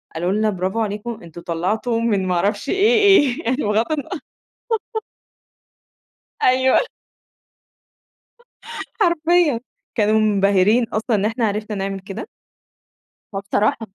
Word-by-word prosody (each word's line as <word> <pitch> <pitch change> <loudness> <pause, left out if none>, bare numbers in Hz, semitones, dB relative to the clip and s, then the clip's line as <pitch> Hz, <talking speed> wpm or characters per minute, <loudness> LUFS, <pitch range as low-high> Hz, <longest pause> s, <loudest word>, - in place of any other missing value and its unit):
قالوا 175 +3 -1
لنا: 215 +1 +1
"برافو 190 +3 -2
عليكم 215 +2 -3
أنتم 170 0 -11
طلعتم 185 +9 -2
من 195 -4 +1
ما 180 - +1
اعرفش 205 +8 -1
إيه 425 +3 +3
إيه" 275 - +4
بغض 215 +7 +1
الن 290 -4 -2 2.4
أيوه 260 +1 +4 2.2
حرفيًا. 340 - +3 0.4
كانوا 215 0 +3
منبهرين 200 +2 +3
أصلًا 220 +1 -1
إن 200 - 0
إحنا 225 +1 0
عرفنا 210 +1 -3
نعمل 195 0 -3
كده. 195 +3 -7 1.1
فبصراحة 205 +3 0
215 Hz, 105 wpm, -20 LUFS, 195-250 Hz, 2.4 s, إيه